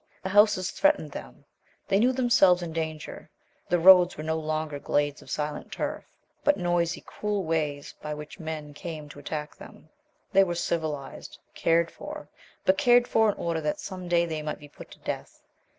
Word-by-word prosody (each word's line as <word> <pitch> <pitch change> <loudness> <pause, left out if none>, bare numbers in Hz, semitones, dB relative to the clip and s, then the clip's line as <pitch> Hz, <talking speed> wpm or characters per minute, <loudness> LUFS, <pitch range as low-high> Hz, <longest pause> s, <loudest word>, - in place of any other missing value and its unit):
The 190 - -2
houses 200 -2 +4
threatened 295 - +2
them; 60 - -10 0.4
they 195 - +3
knew 245 +4 +4
themselves 215 -8 +4
in 165 -2 -5
danger. 160 -1 -5 0.4
The 175 - +3
roads 180 +1 +7
were 155 - -5
no 160 +1 -1
longer 155 -1 -3
glades 145 0 0
of - - -15
silent 150 0 -4
turf, - - -4 0.4
but 290 - +4
noisy, 175 -1 0
cruel 210 -2 -3
ways 150 -3 -2
by 150 0 -4
which 150 0 -9
men 155 -2 -6
came 155 -1 -7
to 145 - -11
attack 150 +1 -5
them. - - -14 0.4
They 195 - +7
were 175 -2 -2
civilized, 155 -5 -3 0.2
cared 165 0 +2
for - - -9 0.4
but 285 0 +3
cared 245 -3 +5
for 220 -1 +3
in 205 - -2
order 165 -1 -2
that 150 -1 -2
some 185 -2 -7
day 170 0 +3
they 160 -2 -4
might 150 0 -4
be 145 - -13
put - - -13
to - - -13
death. - - -6
165 Hz, 180 wpm, -27 LUFS, 150-190 Hz, 0.4 s, roads